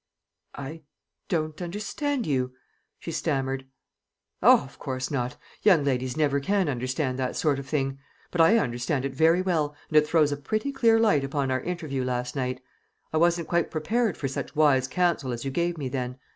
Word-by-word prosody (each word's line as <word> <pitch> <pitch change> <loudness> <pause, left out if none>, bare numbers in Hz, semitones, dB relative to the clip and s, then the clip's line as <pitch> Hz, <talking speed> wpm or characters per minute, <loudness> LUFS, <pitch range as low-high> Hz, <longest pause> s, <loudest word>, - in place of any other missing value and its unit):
"I 145 +4 -7 0.5
don't 155 -1 -1
understand 215 - -2
you," 130 -3 0 0.4
she 165 - -7
stammered. 135 -4 -1 0.7
"O, - - +7
of 135 -1 -14
course 130 -1 -3
not; 125 -3 -2 0.2
young 185 -8 +5
ladies 130 -1 -1
never 145 -2 +2
can 195 +5 +1
understand 130 +1 -2
that 130 -1 -1
sort 145 -4 +1
of 135 - -8
thing. 135 -2 -1 0.3
But 175 - +2
I 210 +8 +6
understand 130 - -1
it 135 - -3
very 165 +6 +4
well, 155 -5 0
and 155 - +3
it 150 0 +5
throws 155 -2 +3
a 145 - -1
pretty 215 - -2
clear 230 -5 +4
light 210 -11 +3
upon 135 -1 -1
our 130 -1 0
interview 155 -7 -3
last 125 0 -2
night. 130 -1 -2 0.5
I - - +2
wasn't 170 0 +2
quite 170 -1 +1
prepared 215 +6 0
for 140 - -2
such 135 - -5
wise 140 -4 +4
counsel 165 -3 0
as 120 +2 -5
you 135 - -2
gave 170 +4 0
me 140 -4 -3
then. 125 -1 -3
145 Hz, 185 wpm, -26 LUFS, 130-170 Hz, 0.7 s, O